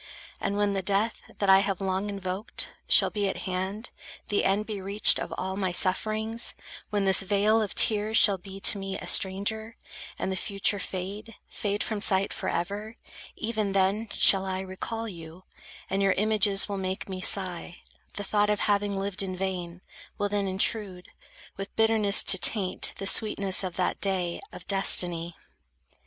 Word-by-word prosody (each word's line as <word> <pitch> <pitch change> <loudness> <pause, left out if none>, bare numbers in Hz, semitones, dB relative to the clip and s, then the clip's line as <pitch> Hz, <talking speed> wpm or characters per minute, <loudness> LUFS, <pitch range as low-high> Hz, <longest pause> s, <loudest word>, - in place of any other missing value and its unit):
And 200 - -2
when 205 -1 +1
the 195 - -1
death, 200 +4 -1
that 200 - -1
I 190 0 +7
have 195 -2 -1
long 190 +1 -2
invoked, 195 0 -3
Shall - - +4
be 205 -2 -1
at - - -5
hand, 190 +4 -4 0.4
the 205 - +1
end 200 +2 +1
be 210 -3 -6
reached 200 +3 +5
of - - -5
all 190 +1 -3
My 190 -2 -1
sufferings; 215 +5 0 0.3
when 205 -1 -1
this 190 -1 +4
vale 205 +3 +2
of 210 - -3
tears 215 +1 +4
shall 200 -3 +5
be 195 +1 -10
To 200 - +3
me 195 0 -5
a - - -8
stranger, 220 +4 -1 0.4
and 190 - -3
the - - -2
future 200 +2 0
fade, 200 +5 -6
Fade 205 0 -3
from 215 -2 -4
sight 195 -1 +3
forever; 205 +6 -4 0.4
even 215 -3 -2
then, 195 +3 +1
shall 195 -1 +4
I 190 0 -3
Recall 205 +4 -5
you; 170 -2 -11 0.4
and 195 +1 -1
your 195 -1 +3
images 210 -1 +2
will 200 -1 -4
make 190 0 -4
Me 185 -1 -6
sigh; 180 -3 -1 0.3
the 205 - -4
thought 210 +1 +1
of 210 -1 0
having 205 -1 0
lived 195 -1 0
in 190 -1 -3
vain, 180 -2 -4 0.4
Will 205 -1 -1
then 200 -1 -1
intrude, 190 -1 -1 0.5
with 195 0 -7
bitterness 220 -2 +3
to 190 - +5
taint 190 -3 +3
The 195 - -5
sweetness 200 -1 +2
of 185 -2 -5
that 185 - -2
day 185 -3 -2
of - - -11
destiny. 175 -3 +1
195 Hz, 170 wpm, -27 LUFS, 190-210 Hz, 0.5 s, I